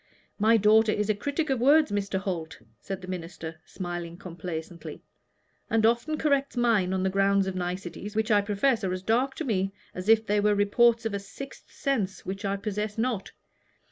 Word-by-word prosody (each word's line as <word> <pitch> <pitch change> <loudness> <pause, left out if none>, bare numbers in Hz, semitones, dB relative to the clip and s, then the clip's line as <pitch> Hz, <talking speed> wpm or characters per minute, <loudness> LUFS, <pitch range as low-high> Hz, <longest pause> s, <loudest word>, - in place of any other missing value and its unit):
"My 225 +2 +5
daughter 215 +1 +5
is 210 0 +1
a - - +2
critic 285 +8 -2
of 265 - +1
words, 290 0 +5
Mr. 200 -1 -1
Holt," 175 -5 -4 0.2
said 195 -1 -6
the - - -8
minister, 165 -3 -6
smiling 175 -2 -6
complacently, 170 -2 -7 0.7
"and 225 -1 +3
often 235 +7 +2
corrects 280 -4 +1
mine 225 -7 +3
on 190 0 0
the 190 - +2
ground 195 0 +3
of 190 - -2
niceties, 185 +3 -5
which 220 +1 +1
I 205 -1 +5
profess 215 +4 +1
are 185 -1 0
as 185 0 -5
dark 250 +6 +1
to 320 - -4
me 195 -5 0 0.2
as 185 +3 -5
if 225 0 +5
they 210 0 +2
were 210 +1 +3
the - - 0
reports 230 +3 +3
of 225 - -1
a 200 - -1
sixth 260 +7 -10
sense 220 -9 -2
which 195 +2 -5
I 200 0 0
possess 210 +1 -3
not. 225 -3 -2
205 Hz, 195 wpm, -27 LUFS, 190-230 Hz, 0.7 s, My